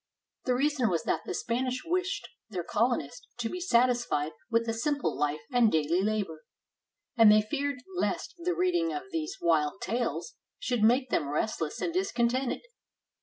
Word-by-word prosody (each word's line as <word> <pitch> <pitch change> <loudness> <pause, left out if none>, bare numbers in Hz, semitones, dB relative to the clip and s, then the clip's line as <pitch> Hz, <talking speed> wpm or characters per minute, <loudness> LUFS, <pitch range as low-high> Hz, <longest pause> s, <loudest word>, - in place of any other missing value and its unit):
The 250 - +2
reason 275 -3 +2
was 170 -2 0
that 165 - -1
the - - -2
Spanish 250 +4 -1
wished 365 +3 -1 0.2
their 185 -5 -3
colonist 210 - -1
to 235 -2 -2
be 360 - -4
satisfied 240 - +2 0.2
with 230 0 +1
a 225 - 0
sim 285 +6 0
ple - - -1
life 150 +1 -1
and 240 -3 +4
daily 160 +3 +2
labor, 200 -6 -1 0.7
and 225 -3 +8
they 215 0 +6
feared 280 +3 -2
lest 360 - -1
the 355 +1 -1
reading 350 -2 +1
of 365 +1 -3
these 325 +2 -3
wild 155 -3 +2
tales 240 - -2 0.2
should 245 -3 -1
make 245 +4 +4
them 145 - +1
restless 155 +1 -2
and 335 - -1
discontented. 260 -9 0
240 Hz, 165 wpm, -29 LUFS, 200-285 Hz, 0.7 s, and